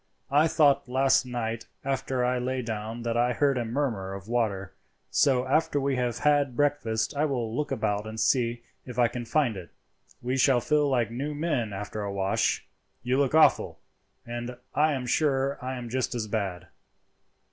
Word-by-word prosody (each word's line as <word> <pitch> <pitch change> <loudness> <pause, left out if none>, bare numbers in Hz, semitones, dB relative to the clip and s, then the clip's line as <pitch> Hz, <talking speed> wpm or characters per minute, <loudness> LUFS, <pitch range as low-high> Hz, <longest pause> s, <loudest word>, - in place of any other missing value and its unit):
I 150 +3 +5
thought 145 -5 +3
last 130 0 +3
night 115 -2 -3 0.2
after 135 -2 -1
I 125 0 +1
lay 130 +1 -2
down 110 +1 -5
that 115 -1 -1
I 120 +1 +2
heard 140 +2 +2
a - - 0
murmur 115 -6 -2
of 100 +1 -9
water, 110 -5 -1 0.4
so 130 -3 +3
after 145 +2 +1
we 140 0 0
have 125 -2 -1
had 145 -4 +2
breakfast 140 -4 0
I 145 +2 +2
will 120 -6 -2
look 150 +1 -2
about 110 -4 -1
and 110 0 -6
see 120 -2 +1 0.2
if 125 -2 -9
I 120 -1 +5
can 120 +1 -6
find 125 -2 +1
it. 90 -3 -8 0.5
We 125 +2 -2
should 130 -2 +4
feel 150 -1 +2
like 120 -4 +1
new 140 +5 -3
men 145 -8 -1
after 105 +2 -5
a 100 -1 -3
wash. 100 0 0 0.4
You 125 +2 +1
look 140 +1 +2
awful, 160 - +4 0.5
and 120 +1 -5 0.2
I 155 +1 +3
am 130 -2 -3
sure 135 +1 +1
I 130 +1 -3
am 120 -1 -6
just 125 +1 -2
as 115 -2 -2
bad." 100 -5 -3
125 Hz, 180 wpm, -27 LUFS, 115-140 Hz, 0.5 s, I